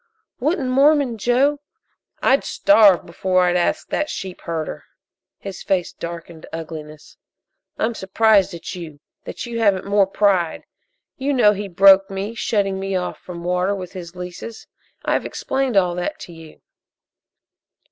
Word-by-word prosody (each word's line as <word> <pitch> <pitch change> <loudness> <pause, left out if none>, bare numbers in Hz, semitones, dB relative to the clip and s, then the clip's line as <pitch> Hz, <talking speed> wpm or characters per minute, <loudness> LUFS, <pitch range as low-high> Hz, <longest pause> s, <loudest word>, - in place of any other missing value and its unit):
"Wouldn't 280 -1 0
Mormon 275 -3 +3
Joe 265 +6 +2 0.3
" - - -33
"I'd - - +4
starve 215 - +4
before 185 +2 +1
I'd 180 0 +2
ask 175 - 0
that 300 - -1
sheepherder!" 170 -4 -5 0.5
His 195 -2 -8
face 185 -3 -1
darkened 170 -1 -8
to - - -9
ugliness. 155 -2 -9 0.6
"I'm 230 +2 0
surprised 200 -1 +2
at 170 +2 -7
you 165 -5 -9 0.3
that - - -6
you 235 -1 -4
haven't 200 -4 +2
more 200 -1 +3
pride. 195 -4 +1 0.5
You 275 +2 -1
know 230 -6 +5
he 205 0 -5
broke 195 +2 +6
me, 195 +3 -4
shutting 200 -4 -1
me 195 0 -3
off 180 -1 -3
from 170 -2 -9
water 180 +3 0
with 185 -2 -8
his 175 -2 -9
leases. 180 +5 -8 0.4
I've - - +1
explained 265 -5 -2
all 180 -2 +3
that 180 - -4
to 175 - -9
you." 165 -1 -14
195 Hz, 145 wpm, -21 LUFS, 175-225 Hz, 0.6 s, broke